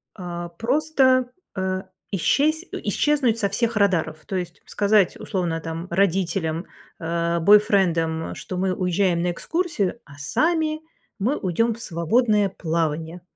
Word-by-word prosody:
а, 175 -2 -6
просто, 255 - +2 0.3
э, 185 0 -2 0.3
исщес 295 - +2
исчезнуть 280 -6 +1
со 200 - +1
всех 230 +3 0
радаров, 185 -6 +1
то 195 - -4
есть 175 -1 -6
сказать, 205 -2 +2
условно, 175 -5 -2
там, 165 +2 -5
родителям, 170 -2 0 0.3
э, 170 0 -1
бойфрендам, 170 -5 +3
что 185 - -6
мы 185 0 +1
уезжаем 180 -1 +1
на 175 0 +1
экскурсию, 280 - -2
а 140 - -14
сами 310 - 0 0.4
мы 240 +9 +1
уйдем 220 +5 +1
в 230 - -11
свободное 210 +4 +2
плавание. 165 -1 -2
190 Hz, 125 wpm, -23 LUFS, 170-230 Hz, 0.4 s, бойфрендам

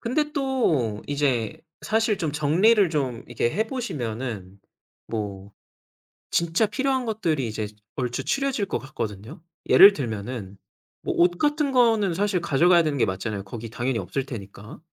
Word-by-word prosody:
근데 295 +6 -1
또 165 - 0
이제 140 -6 -1 0.2
사실 220 -2 +1
좀 160 -6 -2
정리를 180 +7 +3
좀 130 -7 -2
이렇게 120 0 -1
해 215 - -1
보시면은 120 - -5 0.5
뭐 100 -3 -5 0.8
진짜 170 +5 +2
필요한 260 +4 -1
것들이 165 - -1
이제 110 -1 -3 0.3
얼추 125 -2 -2
추려질 275 -7 0
것 - - -2
같거든요. 115 - -6 0.3
예를 200 +1 +9
들면은 110 - -5 0.5
뭐 - - -1
옷 175 0 +3
같은 295 -1 +1
거는 225 -7 +3
사실 195 -1 0
가져가야 170 +2 +4
되는 150 -2 -1
게 - - +4
맞잖아요 100 +2 -3
거기 115 +3 -8
당연히 120 +1 -2
없을 100 +9 -3
테니까. 105 -4 -9
145 Hz, 300 characters per minute, -24 LUFS, -, 0.8 s, 예를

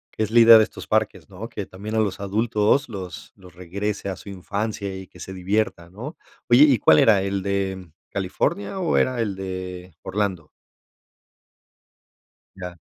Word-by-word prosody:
Es 110 -1 -1
la 120 - +6
idea 115 0 +10
de 110 - +6
estos 110 - -8
parques, 110 -1 0
¿no?, 100 +4 -7
que 100 - -5
también 105 +4 -7
a - - +2
los 100 -3 0
adultos 105 +6 +1
los 95 -6 -8
los 90 -3 -16
regrese 100 +3 -4
a 95 - -3
su 100 - -12
infancia, 100 +2 -4
y 95 0 -8
que - - -18
se 95 - -7
diviertan, 95 -2 -2
¿no? 125 - -8 0.3
Oye, 120 +4 +8
¿y 140 -6 +5
cuál 75 -5 +6
era, 105 -4 +5
el 100 0 -2
de 95 -3 -2 0.2
California, 100 - -2
o 175 -3 +1
era 130 -1 +1
el 105 -4 -2
de 95 -1 -6
Orlando? 95 -5 -2 2.1
Ya. 90 -2 -8
100 Hz, 165 wpm, -23 LUFS, 95-110 Hz, 2.1 s, idea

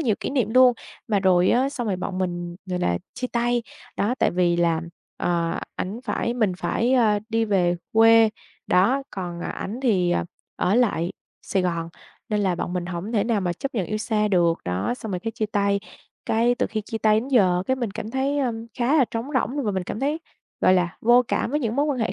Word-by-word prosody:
nhiều 235 -9 +2
kỷ - - -3
niệm 250 -6 0
luôn. 255 -1 +7 0.4
Mà 205 -3 +2
rồi 185 -1 +4
á 260 +3 +3
xong 255 -4 -4
rồi 195 -3 0
bọn 185 0 -4
mình, 175 -1 -3
gọi 180 -1 -2
là, 85 - 0 0.2
chia 255 - -3
tay, 240 0 0 0.3
đó, 225 +5 +1
tại - - +3
vì 175 -1 +2
là, 170 -2 +2 0.4
ờ, 170 -1 -1 0.2
ảnh 205 +6 -4
phải 235 -1 -1
mình 215 -6 +1
phải, 240 +7 0
a, 220 -5 +4
đi 225 0 +1
về 180 -5 +2 0.2
quê, 225 0 +6 0.4
đó, 240 +10 +3
còn 175 -3 -5
ảnh 215 +7 -5
thì 185 -8 +2 0.4
ở 185 +4 +1
lại 200 -8 +1 0.3
Sài 190 - 0
Gòn, 170 -2 -1 0.4
nên 210 -2 0
là 190 -3 +1
bọn 175 - -4
mình 180 -1 -2
hổng 180 +5 -5
thể 210 -4 +2
nào 230 -3 +1
mà 180 -2 -1
chấp 270 +10 -5
nhận 195 -6 -1
yêu 215 - -2
xa 215 -1 0
được. 170 -4 +2
Đó, 90 - -1
xong 220 -4 -7
rồi 180 - -2
cái 225 - -3
chia 220 -1 -2
tay. 200 -1 +1 0.5
Cái 235 +2 +2
từ - - 0
khi 220 - -3
chia 225 +2 -5
tay 215 0 +3
đến 250 - -7
giờ 185 -9 +3
cái 260 - +1
mình 240 -5 -2
cảm 215 +2 -6
thấy, 270 +3 0
ơ, 255 -4 +1 0.3
khá 250 +5 +2
là 270 - +5
trống 230 +2 -3
rỗng, 265 +2 0
và 210 - +1
mình 190 -1 -1
cảm 210 - -5
thấy, 295 +4 -1 0.4
gọi 185 - +5
là, 175 -2 0
vô 240 +2 +5
cảm - - 0
với 295 +2 0
những 230 -2 -2
mối 290 +1 +2
quan 285 -4 -1
hệ 225 -1 0
215 Hz, 230 wpm, -24 LUFS, 180-240 Hz, 0.5 s, luôn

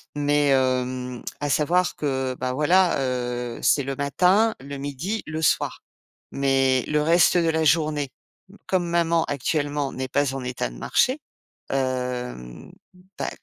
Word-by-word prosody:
mais 145 0 +2
hem, 130 -1 0 0.2
à 145 - -1
savoir 175 +6 +2
que, 130 -3 -2
bah, 125 0 -2
voilà, 175 +6 +3
heu, 125 -2 -3
c'est 140 - +3
le 135 +1 -4
matin, 185 +10 +3
le 140 +1 -7
midi, 145 +10 -4
le 155 +1 -4
soir 155 - 0 0.5
mais 135 -2 +2
le 150 0 +1
reste 170 +3 +4
de 165 -1 +2
la 160 0 +1
journée 150 -3 +1 0.6
comme 185 -2 0
maman 170 -1 +2
actuellement 145 0 -1
n'est 130 0 -4
pas 140 0 0
en 135 - -4
état 125 - -3
de - - -12
marcher, 260 - +1 0.5
heu, 125 - -3 0.5
bah, - - -1
140 Hz, 145 wpm, -24 LUFS, 130-160 Hz, 0.6 s, reste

